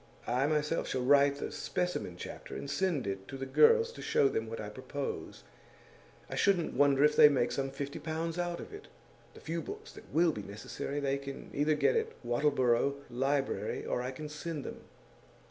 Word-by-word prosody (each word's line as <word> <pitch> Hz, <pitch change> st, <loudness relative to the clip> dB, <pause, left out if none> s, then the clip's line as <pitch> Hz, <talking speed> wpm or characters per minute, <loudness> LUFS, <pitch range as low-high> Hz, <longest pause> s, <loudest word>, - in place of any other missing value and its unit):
I 130 Hz, +4 st, +1 dB
myself 150 Hz, +1 st, 0 dB
shall 130 Hz, -, -1 dB
write 140 Hz, +1 st, +5 dB
the 140 Hz, -, -5 dB
specimen 180 Hz, -, -2 dB
chapter, -, -, -8 dB
and -, -, -5 dB
send 145 Hz, +1 st, 0 dB
it 95 Hz, -1 st, -4 dB
to 135 Hz, -, -7 dB
the 135 Hz, -, -4 dB
girls 460 Hz, -, +5 dB
to -, -, -10 dB
show 450 Hz, -1 st, +3 dB
them 445 Hz, +2 st, -2 dB
what 465 Hz, -, -6 dB
I -, -, -4 dB
propose. 445 Hz, -3 st, -5 dB, 0.8 s
I -, -, -8 dB
shouldn't 185 Hz, -5 st, +2 dB
wonder 140 Hz, +1 st, +4 dB
if 150 Hz, -, +5 dB
they 150 Hz, -, +9 dB
make 125 Hz, -4 st, +1 dB
some 135 Hz, 0 st, -1 dB
fifty 140 Hz, +1 st, -5 dB
pounds 165 Hz, +2 st, -3 dB
out 175 Hz, -1 st, -2 dB
of -, -, -9 dB
it. 410 Hz, -, -10 dB, 0.5 s
The -, -, -12 dB
few 165 Hz, +1 st, -3 dB
books 435 Hz, +3 st, -8 dB
that -, -, -14 dB
will 165 Hz, +1 st, +4 dB
be 105 Hz, -, -5 dB
necessary 105 Hz, +8 st, -5 dB
they 140 Hz, -1 st, 0 dB
can 140 Hz, 0 st, -8 dB
either 150 Hz, +2 st, +2 dB
get 150 Hz, -, +3 dB
at 455 Hz, 0 st, 0 dB
a -, -, -14 dB
Wattleborough 130 Hz, 0 st, +2 dB, 0.2 s
library, 135 Hz, +3 st, -1 dB
or -, -, -1 dB
I 125 Hz, -, -3 dB
can 150 Hz, +4 st, -6 dB
send 150 Hz, 0 st, -5 dB
them. -, -, -7 dB
145 Hz, 195 wpm, -32 LUFS, 135-175 Hz, 0.8 s, they